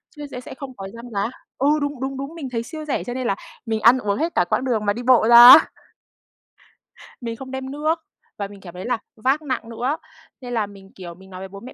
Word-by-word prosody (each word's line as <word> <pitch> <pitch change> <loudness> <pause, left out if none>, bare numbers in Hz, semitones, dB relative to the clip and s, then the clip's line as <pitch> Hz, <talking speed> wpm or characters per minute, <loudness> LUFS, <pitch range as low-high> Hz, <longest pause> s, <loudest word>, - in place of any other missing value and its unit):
chứ 295 0 -7
sẽ 250 - -6
sẽ - - -10
không 265 -2 -9
có 195 0 -6
dăng 235 +1 -10
giá. 205 +3 -1 0.3
Ừ, 275 - +1
đúng, 285 -2 -3
đúng, 265 0 -3
đúng, 275 +5 -6
mình 280 -6 -6
thấy 230 -1 -2
siêu 310 +4 -8
rẻ 290 - -2
cho 245 - -5
nên 255 -1 -3
là 195 - +1 0.3
mình 220 -1 -2
ăn 240 +3 +7
uống 200 -3 -1
hết 330 +3 -2
cả 175 - +3
quãng 260 - 0
đường 220 -5 0
mà 205 - +2
đi 240 +2 -6
bộ 245 -3 +5
ra 240 +1 +11
á. 315 - +9 1.5
Mình 230 -1 -4
không 260 +2 -9
đem 265 0 -5
nước 310 +3 -1 0.4
và 200 - -3
mình 200 -1 -14
cảm 175 -2 -11
thấy 180 +1 -8
là 245 -1 0 0.2
vác 265 +7 +1
nặng 255 -5 -4
nữa. 250 +6 -2 0.4
Nên 245 -1 -6
là 220 -3 +1
mình, 195 -1 -15
kiểu, 175 -2 -9
mình 190 +1 -17
nói 185 0 -9
với 190 - -6
bố 195 +1 -11
mẹ 255 - -11
245 Hz, 260 wpm, -22 LUFS, 205-265 Hz, 1.5 s, ra